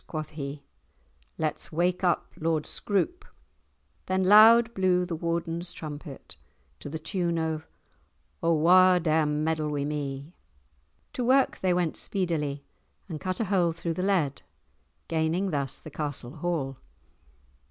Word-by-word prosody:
quoth 155 Hz, -1 st, -5 dB
he; 140 Hz, -1 st, -6 dB, 0.7 s
"let's 155 Hz, -2 st, -3 dB
wake 175 Hz, +3 st, 0 dB
up 175 Hz, -2 st, 0 dB
Lord 160 Hz, -1 st, -1 dB
Scroope!" 275 Hz, -, -1 dB, 0.8 s
Then 185 Hz, 0 st, +1 dB
loud 225 Hz, +4 st, +7 dB
blew 185 Hz, -2 st, +2 dB
the 175 Hz, -2 st, -4 dB
Warden's 170 Hz, +1 st, -2 dB
trumpet 150 Hz, -2 st, -8 dB, 0.4 s
to -, -, -7 dB
the 160 Hz, -, -4 dB
tune 170 Hz, +1 st, -1 dB
of 160 Hz, -1 st, -2 dB, 0.7 s
"O 170 Hz, -, +2 dB
wha 180 Hz, +3 st, +6 dB
dare 160 Hz, -2 st, +2 dB
meddle 155 Hz, +1 st, 0 dB
wi' 145 Hz, -1 st, -2 dB
me?" 145 Hz, +1 st, -4 dB, 0.8 s
To 250 Hz, -, -2 dB
work 265 Hz, +2 st, +3 dB
they 185 Hz, -, +1 dB
went 175 Hz, -2 st, 0 dB
speedily, 155 Hz, -7 st, -2 dB, 0.4 s
and 160 Hz, -5 st, -6 dB
cut 185 Hz, -1 st, -3 dB
a 225 Hz, -, 0 dB
hole 180 Hz, -4 st, +2 dB
through 165 Hz, 0 st, -3 dB
the 180 Hz, -, -3 dB
lead, 180 Hz, -8 st, +1 dB, 0.7 s
gaining 165 Hz, +4 st, 0 dB
thus 140 Hz, -3 st, -2 dB
the 155 Hz, -, -11 dB
castle 145 Hz, -2 st, -5 dB
hall. 150 Hz, -5 st, -2 dB
165 Hz, 135 wpm, -27 LUFS, 150-185 Hz, 0.8 s, loud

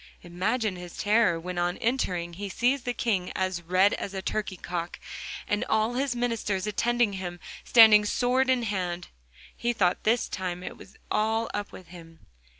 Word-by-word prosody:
Imagine 190 Hz, +4 st, -1 dB
his 180 Hz, -1 st, -9 dB
terror 210 Hz, -5 st, +3 dB
when 180 Hz, +1 st, -4 dB
on 175 Hz, +1 st, 0 dB
entering 180 Hz, -8 st, -1 dB
he 200 Hz, +3 st, -5 dB
sees 250 Hz, +7 st, +1 dB
the 245 Hz, -, -2 dB
King 200 Hz, -6 st, 0 dB
as 185 Hz, -2 st, -1 dB
red 185 Hz, +4 st, +3 dB
as 195 Hz, -, -4 dB
a 190 Hz, -, -3 dB
turkey 210 Hz, -3 st, -2 dB
cock, 175 Hz, 0 st, -5 dB, 0.5 s
and 205 Hz, -, 0 dB
all 220 Hz, +2 st, +1 dB
his 260 Hz, 0 st, -1 dB
ministers 230 Hz, -5 st, -1 dB
attending 230 Hz, +1 st, +1 dB
him 175 Hz, -2 st, -5 dB, 0.2 s
standing 220 Hz, -3 st, +8 dB
sword 250 Hz, +5 st, +1 dB
in 255 Hz, -2 st, +3 dB
hand. 180 Hz, -4 st, -3 dB, 0.5 s
He 240 Hz, 0 st, -1 dB
thought 185 Hz, -5 st, +1 dB
this 225 Hz, +2 st, +2 dB
time 180 Hz, -1 st, -4 dB
it -, -, -6 dB
was 195 Hz, -, -15 dB
all 220 Hz, +1 st, +1 dB
up 205 Hz, 0 st, -4 dB
with 185 Hz, -, -12 dB
him. 165 Hz, -2 st, -14 dB
205 Hz, 170 wpm, -27 LUFS, 180-230 Hz, 0.5 s, standing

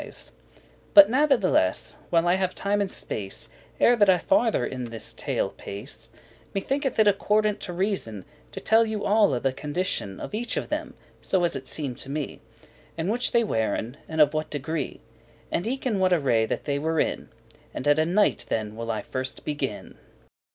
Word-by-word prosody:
*describe, -, -, -6 dB
relate -, -, -29 dB, 0.3 s
But 300 Hz, -1 st, +11 dB
natheless, 230 Hz, -, +2 dB
while 170 Hz, 0 st, +3 dB
I 175 Hz, -, +4 dB
have 185 Hz, -1 st, 0 dB
time 205 Hz, +1 st, 0 dB
and 200 Hz, -, -1 dB
space, 105 Hz, -, -4 dB, 0.3 s
Ere 245 Hz, -, +6 dB
that 205 Hz, -3 st, +5 dB
I 185 Hz, -, +6 dB
farther 240 Hz, -, +2 dB
in 130 Hz, -1 st, -4 dB
this 115 Hz, -1 st, -5 dB
tale -, -, -1 dB
pace, 110 Hz, +3 st, -8 dB, 0.5 s
Me -, -, +2 dB
thinketh 275 Hz, +3 st, -1 dB
it 220 Hz, -1 st, +5 dB
accordant 210 Hz, +1 st, +2 dB
to -, -, -6 dB
reason, 175 Hz, -, -2 dB, 0.3 s
To -, -, -6 dB
tell 225 Hz, +1 st, +4 dB
you 215 Hz, -1 st, -3 dB
alle 205 Hz, -, +3 dB
the 135 Hz, +1 st, 0 dB
condition 145 Hz, -, -2 dB
Of -, -, -7 dB
each 235 Hz, +3 st, -2 dB
of -, -, -3 dB
them, -, -, -3 dB, 0.3 s
so 190 Hz, -2 st, +1 dB
as 170 Hz, -, +2 dB
it 135 Hz, -1 st, -6 dB
seemed 135 Hz, -5 st, -3 dB
me, 145 Hz, 0 st, -4 dB, 0.6 s
And 165 Hz, +5 st, -1 dB
which 245 Hz, +2 st, +1 dB
they 235 Hz, -, +4 dB
weren, 110 Hz, -, -1 dB
and 160 Hz, 0 st, -4 dB
of 150 Hz, -1 st, +6 dB
what 155 Hz, 0 st, -2 dB
degree; 155 Hz, +2 st, -4 dB, 0.5 s
And 175 Hz, -, -1 dB
eke 265 Hz, +3 st, -3 dB
in 220 Hz, -6 st, +1 dB
what 185 Hz, -1 st, +3 dB
array 125 Hz, -9 st, +2 dB
that -, -, -3 dB
they 140 Hz, -1 st, -1 dB
were 160 Hz, +1 st, 0 dB
in: -, -, -1 dB, 0.4 s
And -, -, -5 dB
at 145 Hz, +1 st, +5 dB
a 155 Hz, -, +3 dB
Knight 205 Hz, +4 st, +2 dB
then 110 Hz, -1 st, -2 dB
will 115 Hz, +1 st, -5 dB
I 110 Hz, -2 st, -2 dB
first 130 Hz, 0 st, -4 dB
begin. 140 Hz, -7 st, -4 dB
165 Hz, 190 wpm, -26 LUFS, 130-210 Hz, 0.6 s, But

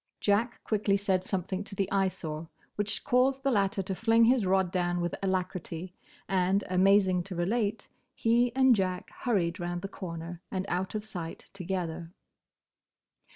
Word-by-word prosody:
Jack 210 Hz, +4 st, +1 dB
quickly 205 Hz, -2 st, +1 dB
said 190 Hz, -2 st, 0 dB
something 190 Hz, +1 st, -2 dB
to 200 Hz, -, -10 dB
the 195 Hz, -1 st, 0 dB
Eyesore 170 Hz, -5 st, -1 dB, 0.3 s
which 205 Hz, 0 st, 0 dB
caused 265 Hz, +2 st, +2 dB
the 275 Hz, -, +2 dB
latter 200 Hz, -3 st, +1 dB
to 190 Hz, +1 st, -3 dB
fling 225 Hz, +3 st, +4 dB
his 235 Hz, -4 st, +3 dB
rod 190 Hz, -1 st, +2 dB
down 175 Hz, -1 st, 0 dB
with 175 Hz, -1 st, -1 dB
alacrity, 185 Hz, -2 st, -2 dB, 0.3 s
and, 190 Hz, +1 st, +2 dB
amazing 190 Hz, 0 st, +4 dB
to 185 Hz, +1 st, -7 dB
relate, 205 Hz, +5 st, -1 dB, 0.3 s
he 235 Hz, +2 st, +3 dB
and 260 Hz, -2 st, +6 dB
Jack 185 Hz, -2 st, -2 dB
hurried 190 Hz, -6 st, -1 dB
round 175 Hz, +1 st, -3 dB
the -, -, -2 dB
corner 170 Hz, -3 st, -7 dB
and 190 Hz, -1 st, -2 dB
out 185 Hz, +3 st, -2 dB
of 210 Hz, 0 st, -3 dB
sight 175 Hz, -6 st, -7 dB
together. 175 Hz, -3 st, -4 dB
190 Hz, 155 wpm, -29 LUFS, 180-210 Hz, 0.3 s, and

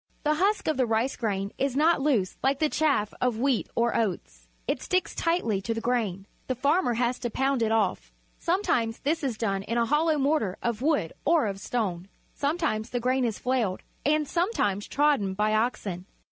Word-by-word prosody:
The 300 Hz, -1 st, +3 dB
husk 390 Hz, +7 st, +1 dB
of 310 Hz, -, +1 dB
the 255 Hz, -2 st, +2 dB
rice 225 Hz, +4 st, +1 dB
grain 200 Hz, -3 st, -2 dB
is 275 Hz, -2 st, 0 dB
not 315 Hz, +1 st, +3 dB
loose 245 Hz, -10 st, +1 dB
like 270 Hz, +1 st, +2 dB
the 310 Hz, +1 st, +1 dB
chaff 280 Hz, -11 st, +1 dB
of 250 Hz, -3 st, +1 dB
wheat 260 Hz, 0 st, +1 dB
or 235 Hz, 0 st, +1 dB
oats. -, -, -2 dB, 0.2 s
It -, -, -1 dB
sticks 370 Hz, -1 st, 0 dB
tightly 330 Hz, -, 0 dB
to 230 Hz, +3 st, -2 dB
the -, -, -2 dB
grain. 220 Hz, -6 st, -1 dB, 0.2 s
The 255 Hz, -, -1 dB
farmer 280 Hz, +1 st, +2 dB
has 245 Hz, +1 st, 0 dB
to 240 Hz, -, -2 dB
pound 265 Hz, +1 st, 0 dB
it 220 Hz, -1 st, +1 dB
off. 220 Hz, -4 st, 0 dB, 0.3 s
Sometimes 290 Hz, -, 0 dB
this 315 Hz, +3 st, 0 dB
is 250 Hz, -5 st, -1 dB
done 195 Hz, -4 st, -1 dB
in 230 Hz, +4 st, -3 dB
a 235 Hz, -, +3 dB
hollow 305 Hz, +4 st, +2 dB
mortar 275 Hz, -9 st, +1 dB
of 235 Hz, -1 st, -1 dB
wood 285 Hz, -, +1 dB
or 325 Hz, -3 st, +3 dB
of 195 Hz, -2 st, -3 dB
stone. 195 Hz, -6 st, -2 dB, 0.3 s
Some 290 Hz, +4 st, -1 dB
times 230 Hz, -10 st, -1 dB
the 245 Hz, -, -2 dB
grain 255 Hz, +2 st, +1 dB
is 225 Hz, -3 st, -1 dB
flailed, 245 Hz, -7 st, -1 dB, 0.2 s
and 300 Hz, +1 st, +2 dB
sometimes 265 Hz, -, 0 dB
trodden 275 Hz, -10 st, +2 dB
by 210 Hz, +2 st, +1 dB
oxen. 205 Hz, -5 st, -1 dB
245 Hz, 195 wpm, -27 LUFS, 215-295 Hz, 0.3 s, The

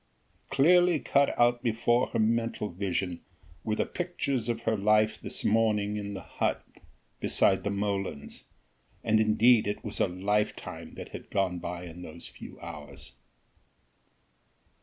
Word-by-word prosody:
Clearly 175 Hz, +3 st, +5 dB
cut 140 Hz, 0 st, +2 dB
out 120 Hz, 0 st, +4 dB
before 120 Hz, +1 st, +2 dB
her -, -, -3 dB
mental 115 Hz, -1 st, 0 dB
vision 90 Hz, -1 st, -2 dB, 0.4 s
were 110 Hz, -, -1 dB
the -, -, 0 dB
pictures 140 Hz, -9 st, -2 dB
of 115 Hz, -1 st, -1 dB
her 110 Hz, -, +1 dB
life 105 Hz, +1 st, +2 dB
this -, -, -4 dB
morning 105 Hz, -1 st, +2 dB
in 100 Hz, -1 st, -4 dB
the 95 Hz, -, -7 dB
hut -, -, -2 dB, 0.5 s
beside 95 Hz, -, +3 dB
the 100 Hz, -, -1 dB
molens: 100 Hz, -6 st, -3 dB, 0.6 s
and 110 Hz, -1 st, +3 dB
indeed, 110 Hz, +1 st, +4 dB
it 105 Hz, -, -3 dB
was 105 Hz, -, -5 dB
a -, -, +3 dB
lifetime 100 Hz, +4 st, -2 dB
that -, -, -8 dB
had -, -, -9 dB
gone 95 Hz, -3 st, 0 dB
by 90 Hz, 0 st, -5 dB
in 85 Hz, +1 st, -10 dB
those 85 Hz, -1 st, -9 dB
few -, -, -11 dB
hours. 80 Hz, -3 st, -9 dB
105 Hz, 140 wpm, -29 LUFS, 95-115 Hz, 0.6 s, Clearly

